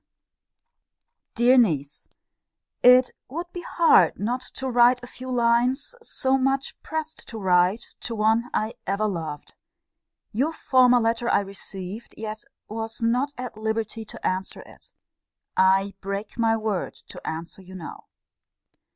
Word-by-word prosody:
] - - -59
DEAR 245 +3 +5
NIECE, 150 - 0 0.7
It 250 +1 +7 0.2
would 340 +6 -6
be 355 - -5
hard 330 - +4
not 240 +5 -1
to 265 - -3
write 245 0 +5
a - - -7
few 255 +1 -9
lines, 245 - +2
so 270 - +1
much 270 +1 0
pressed 315 0 -5
to 225 - -7
write, 185 +2 +2
to 230 - -4
one 220 +3 +2
I 215 +1 -1
ever 200 +2 +1
loved. 160 -6 -5 0.8
Your 275 +9 0
former 250 -4 +4
letter 230 +1 0
I - - +3
received; 195 +2 -7
yet 215 0 -6 0.2
was 225 +1 -5
not 250 +5 +1
at 250 -2 -6
liberty 220 0 -3
to - - -9
answer 185 +1 -2
it. - - -15 0.6
I 195 +1 +3
break 200 +2 -4
my 225 -1 +2
word 215 -4 -2
to - - -11
answer 165 +4 -5
you 185 0 -12
now. 170 -3 -9
225 Hz, 140 wpm, -25 LUFS, 195-250 Hz, 0.8 s, It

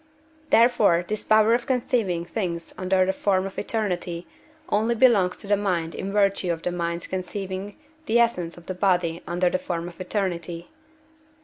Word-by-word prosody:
Therefore 215 -7 +4
this 215 0 -4
power 220 +1 +5
of 240 0 0
conceiving 230 -9 0
things 170 -2 -4
under 185 0 +2
the 190 - 0
form 190 -1 +1
of 195 - -5
eternity 180 -6 -2 0.4
only 225 +3 +1
belongs 215 -7 +4
to - - -9
the 205 +1 +3
mind 180 -5 -1
in 195 - -4
virtue 195 -3 +2
of 165 -1 -4
the 180 - -1
mind's 170 -1 -3
conceiving 190 +1 -5 0.3
the 230 - +3
essence 180 -9 +1
of 175 - -14
the 185 - -4
body 180 -3 +1
under 175 +1 +1
the 185 - 0
form 170 -1 -4
of 175 +1 -10
eternity. 175 -4 -3
185 Hz, 170 wpm, -25 LUFS, 175-210 Hz, 0.4 s, power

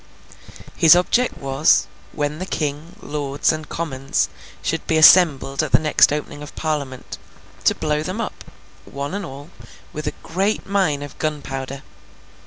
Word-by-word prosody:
His 165 +1 +7
object 240 +8 +1
was, 135 0 +2 0.3
when 150 +1 -3
the 185 - -5
King, 155 +1 -4
lords, 145 -1 0
and 155 -1 -6
commons, 135 -5 -2 0.3
should 165 - -2
be 160 - +2
assembled 155 -5 +6
at 155 - -4
the - - +9
next 155 -2 +4
opening 145 0 -4
of 150 - -10
Parliament, 145 -5 -4 0.5
to - - +4
blow 150 -1 -1
them 185 +7 -4
up, 230 - -5 0.4
one 140 +3 -5
and 200 +1 -3
all, 145 0 -9 0.4
with 150 0 -5
a 150 - -2
great 195 +4 -1
mine 185 -8 0
of 145 - -9
gunpowder. 135 -3 -4
150 Hz, 150 wpm, -21 LUFS, 140-165 Hz, 0.5 s, the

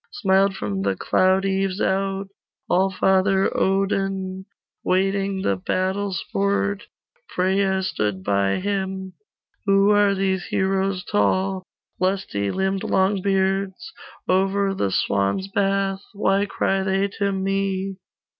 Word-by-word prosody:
Smiled 195 -3 +2
from 100 - -3
the 100 0 0
cloud 190 - +2
eaves 195 0 0
out 195 0 -1 0.4
Allfather 190 +1 +2
Odin, 195 -1 -1 0.4
Waiting 195 +1 0
the 100 - +1
battle 190 - -1
sport: 200 +2 -1 0.5
Freya 190 +1 +1
stood 105 - -2
by 100 0 +1
him. 190 -1 -3 0.5
'Who 195 +1 +4
are 205 -1 +4
these 190 -1 0
heroes 190 0 0
tall 185 - +1 0.4
Lusty 185 - -1
limbed 190 - -1
Longbeards? 195 - 0 0.4
Over 195 +1 +2
the 100 - -1
swans' 100 - 0
bath 195 -1 0
Why 200 0 +1
cry 195 0 0
they 190 +1 +1
to 200 -1 +1
me? 195 0 -1
195 Hz, 110 wpm, -23 LUFS, 190-195 Hz, 0.5 s, Who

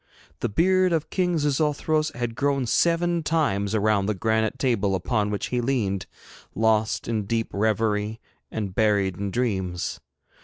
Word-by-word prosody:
The - - -1
beard 185 - +3
of 160 -2 -1
King 180 -2 +1
Xixouthros 150 +1 +1
had 120 -1 -3
grown 140 +1 0
seven 170 +6 +2
times 125 -11 0
around 105 -2 +2
the 105 - 0
granite 110 +2 0
table 105 -7 +1
upon 105 +3 0
which 105 -1 -3
he 125 -1 0
leaned, 110 -7 -1 0.5
lost 110 0 +1
in 110 -3 -1
deep 115 0 -1
reverie, 105 +1 0 0.3
and 100 -4 -4
buried 100 -3 +2
in 100 0 -3
dreams. 95 -6 -2
110 Hz, 145 wpm, -25 LUFS, 100-145 Hz, 0.5 s, beard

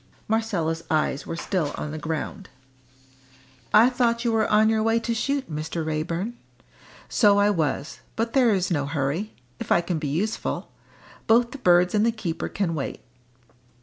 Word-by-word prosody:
Marcella's 195 -8 -1
eyes 155 -3 0
were - - -3
still 170 -3 -2
on 150 - -4
the 155 - -5
ground. 160 +5 -4 1.2
"I 220 +3 +7
thought 240 -1 +1
you 235 - +2
were 225 -1 +2
on 215 +1 +5
your 220 0 +2
way 225 +1 +2
to 230 0 -2
shoot, 275 +4 -1
Mr. 155 +1 -4
Raeburn?" 165 +7 -2 0.7
"So 205 -4 +4
I 205 +1 +4
was, 155 -4 -2 0.2
but 230 +1 -2
there 255 -3 +4
is 190 -3 +1
no 145 -4 0
hurry; 150 +8 -2 0.3
if - - -6
I 175 - +5
can 170 -2 -2
be 150 - -3
useful. 190 +10 -2 0.6
Both 235 +2 +4
the 280 - -8
birds 180 -4 +4
and 210 0 +3
the 230 - +3
keeper 175 -7 -4
can 190 -4 -1
wait." 145 -4 -4
195 Hz, 170 wpm, -25 LUFS, 160-225 Hz, 1.2 s, I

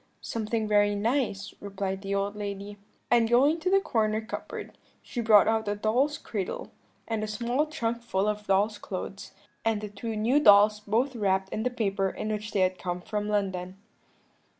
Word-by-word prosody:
"'Something 220 0 -2
very 205 -1 +3
nice,' 215 -2 -1
replied 195 -1 -4
the 200 0 -2
old 200 +1 -1
lady; 205 0 -5 0.4
and 235 -2 +4
going 280 +7 +4
to 355 +3 0
the 390 +1 +5
corner 220 - 0
cupboard, 220 +1 -7 0.3
she 240 - -4
brought 215 -3 +6
out 220 -1 +1
a 205 - 0
doll's 245 +8 +1
cradle, 200 -5 -5 0.4
and 225 -2 -2
a - - -2
small 240 +7 0
trunk 235 -5 -2
full 205 -4 -1
of 210 0 -2
doll's 205 +2 +2
clothes, 195 +1 -6 0.3
and 225 -2 +1
the 210 0 -6
two 220 +2 -5
new 235 +7 +3
dolls 210 -3 +6
both 230 +6 0
wrapped 190 -3 +1
in 215 - -3
the 250 - +1
paper 195 -5 0
in 215 - -5
which 210 0 -3
they 200 - +1
had 185 -1 +1
come 180 0 -3
from 210 +2 -3
London. 190 -3 -2
210 Hz, 180 wpm, -28 LUFS, 200-230 Hz, 0.4 s, brought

